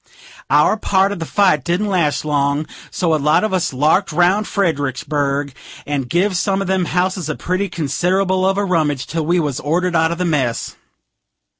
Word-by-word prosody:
Our 150 +9 +4
part 195 -2 +1
of 205 - -5
the 165 - -5
fight 185 -9 +2
didn't 175 +7 0
last 170 -8 0
long; 145 0 0 0.2
so 170 -3 0
a 155 - +1
lot 150 +6 +3
of 215 - -1
us 185 -2 0
larked 155 +9 +1
round 180 +6 +2
Fredericksburg, 145 - -1 0.3
and 140 -4 -3
give 185 +3 +1
some 190 +2 0
of 195 - -3
them 190 -1 +1
houses 180 -1 -1
a 155 - -2
pretty 185 +2 -2
consid'able 185 +4 0
of 195 - -1
a 205 - +1
rummage, 155 -7 0
till 160 -2 -3
we 175 +1 +2
was 145 -5 -2
ordered 175 +4 -1
out 160 0 +2
of 170 - -3
the 180 - -1
mess. 135 -8 -1
170 Hz, 185 wpm, -18 LUFS, 150-185 Hz, 0.3 s, Our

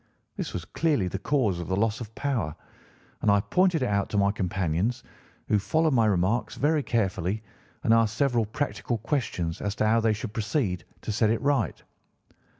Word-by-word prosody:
This - - -4
was - - -5
clearly 150 - +1
the 95 +1 -3
cause 110 -7 +1
of 85 - -5
the 95 - 0
loss 110 +3 0
of 110 -1 -8
power, 120 - -1 0.7
and - - +2
I 100 0 +5
pointed 165 - +2
it - - +1
out 100 -1 0
to 105 - -2
my 100 0 +4
companions, 95 +4 -1 0.4
who 105 - +3
followed 160 +8 +1
my 115 -3 +4
remarks 100 +4 +1
very 150 +1 +2
carefully 105 -4 -1 0.4
and 115 - +4
asked 115 -1 +3
several 120 -6 +2
practical 120 0 -2
questions 110 - -2
as 100 0 -2
to - - +1
how 110 +2 +4
they 110 -1 +2
should 105 0 -5
proceed 105 - -1 0.2
to - - -2
set 110 +1 +2
it 115 - +1
right. 140 -4 0
110 Hz, 185 wpm, -27 LUFS, 100-125 Hz, 0.7 s, I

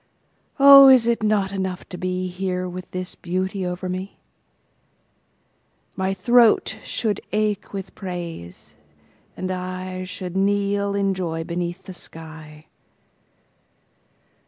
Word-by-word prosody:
Oh, 275 0 +10
is 260 -3 +7
it 235 -1 +1
not 210 -3 +1
enough 190 -2 -4
to 185 - -7
beHere 185 0 -3
with 180 +1 -8
this 185 0 -4
beauty 185 +2 -3
over 180 +1 -4
me? 185 +2 -5 1.8
My 190 0 -1
throat 235 +3 +3
should 215 -3 -2
ache 210 -1 -1
with 195 -1 -6
praise, 170 - -8 0.6
and 185 0 -3
IShould 185 0 -5
kneel 200 +1 +1
in 195 -1 +1
joy 165 -3 -3
beneath 175 +2 -4
the 190 - -9
sky. 155 -2 -10
185 Hz, 110 wpm, -22 LUFS, 180-200 Hz, 1.8 s, Oh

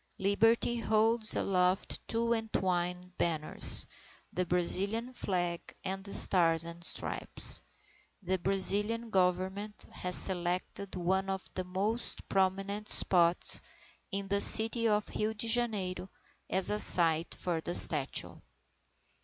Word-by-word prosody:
Liberty 225 +4 +1
holds 220 0 +2
aloft 185 0 0
two 230 +1 -1
entwined 180 -5 -4
banners, 160 -3 -1 0.5
the 180 0 -3
Brazilian 200 +8 0
Flag 175 -6 -3 0.2
and 195 +1 -6
the 200 - -11
Stars 165 -3 +3
and 170 0 -10
Stripes. - - -2 0.6
The 190 +1 -2
Brazilian 205 +5 +3
Government 190 +3 -3
has 180 -1 -4
selected 185 +2 -1
one 190 +2 -2
of 190 -1 -5
the 185 - -5
most 200 +6 -4
prominent 195 +2 -3
spots 175 -1 +5 0.5
in 195 0 -5
the 200 +1 -1
city 225 +1 0
of 210 -1 -1
Rio 215 +1 -2
Janeiro, 215 -5 -2 0.4
as 190 +1 +1
a 210 - -2
site 165 -3 +1
for 170 -3 -4
the 175 +2 -3
statue. 145 -4 +7
190 Hz, 115 wpm, -29 LUFS, 180-210 Hz, 0.6 s, statue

